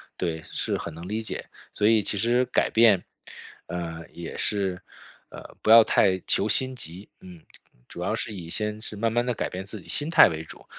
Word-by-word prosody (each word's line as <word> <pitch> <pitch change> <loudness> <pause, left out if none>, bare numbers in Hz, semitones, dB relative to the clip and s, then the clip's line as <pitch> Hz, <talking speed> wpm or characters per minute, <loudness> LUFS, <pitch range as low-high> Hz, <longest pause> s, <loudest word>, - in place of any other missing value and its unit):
对， 80 -3 -3
是 - - -2
很 85 - -6
能 85 +2 -9
理 110 +3 -2
解。 110 - -5 0.3
所 105 - 0
以 110 -1 +5
其 100 - 0
实 120 +4 +2
改 125 - +1
变， 110 -5 +5 0.7
呃， 85 -2 -5
也 85 -1 -8
是 95 -3 -1 0.5
呃， - - -12
不 - - -2
要 115 +1 +10
太 95 -2 +3
求 105 - +2
心 130 +5 +1
急， 95 -2 -8
嗯， 90 -3 -13 0.5
主 - - -9
要 - - -1
是 110 - -4
以 85 -4 -8
先 105 +3 -2
是 110 - -6
慢 115 +2 +1
慢 120 +1 +1
地 125 - 0
改 - - -2
变 95 +1 -6
自 100 +2 -9
己 - - -16
心 145 +2 -1
态 170 - +8
为 80 -3 -4
主。 - - -12
100 Hz, 225 characters per minute, -25 LUFS, 90-115 Hz, 0.7 s, 要